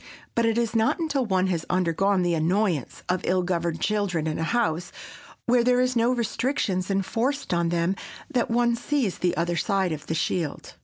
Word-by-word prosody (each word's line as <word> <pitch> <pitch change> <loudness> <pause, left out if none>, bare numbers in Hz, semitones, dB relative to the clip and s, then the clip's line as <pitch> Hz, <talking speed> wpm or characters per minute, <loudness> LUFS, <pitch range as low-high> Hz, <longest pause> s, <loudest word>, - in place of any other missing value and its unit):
But 230 -1 +2
it 225 0 +1
is 235 -1 0
not 225 0 +3
until 285 -7 -1
one 190 -2 +2
has 175 -4 -1
undergone 185 +2 +2
the 175 -1 +1
annoyance 170 - 0
of 180 0 0
ill 185 0 +1
governed 170 -2 -1
children 200 -6 0
in 155 0 -2
a - - 0
house 175 -4 0 0.5
where 240 0 +4
there 250 0 +3
are 255 - +4
no 235 +1 +3
restrictions 230 -5 -1
enforced 230 +7 -1
on 170 -1 +1
them 170 +2 +1 0.3
that 245 -2 0
one 235 0 +2
sees 240 -4 -1
the 175 -3 0
other 170 +1 0
side 190 +1 +1
of 155 -1 -5
the 160 - -1
shield. 160 -2 -2
190 Hz, 190 wpm, -25 LUFS, 170-235 Hz, 0.5 s, where